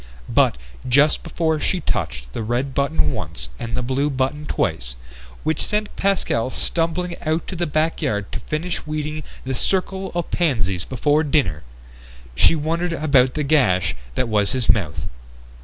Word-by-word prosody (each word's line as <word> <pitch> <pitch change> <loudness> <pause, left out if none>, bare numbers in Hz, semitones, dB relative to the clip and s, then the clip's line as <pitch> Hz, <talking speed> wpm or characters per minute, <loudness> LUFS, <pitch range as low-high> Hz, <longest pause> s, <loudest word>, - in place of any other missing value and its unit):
But - - +3 0.3
just 145 +4 +5
before 160 -2 0
she 185 - 0
touched 60 - -3
the - - -3
red 120 +5 -1
button 80 - +1
once 60 -1 -5
and 115 0 -3
the - - -1
blue 135 +3 +1
button 140 +2 -1
twice - - -1 0.5
which 160 - 0
sent 210 0 -1
Pascal 195 -11 +1
stumbling 170 +5 -1
out 160 +1 0
to 190 - -4
the 175 0 -1
backyard 150 -9 0
to - - -3
finish 160 +2 -3
weeding 155 0 -3 0.2
the 130 - -1
circle 190 +6 0
of 175 -1 -2
pansies 105 - +1
before 145 +5 +2
dinner 140 - +1 0.7
she - - +5
wondered 165 +3 -1
about 140 -5 +3
the 150 - 0
gash 95 - +3 0.2
that 125 - +1
was 105 -2 +2
his 125 -3 0
mouth. 95 -9 +2
145 Hz, 155 wpm, -22 LUFS, 115-160 Hz, 0.7 s, just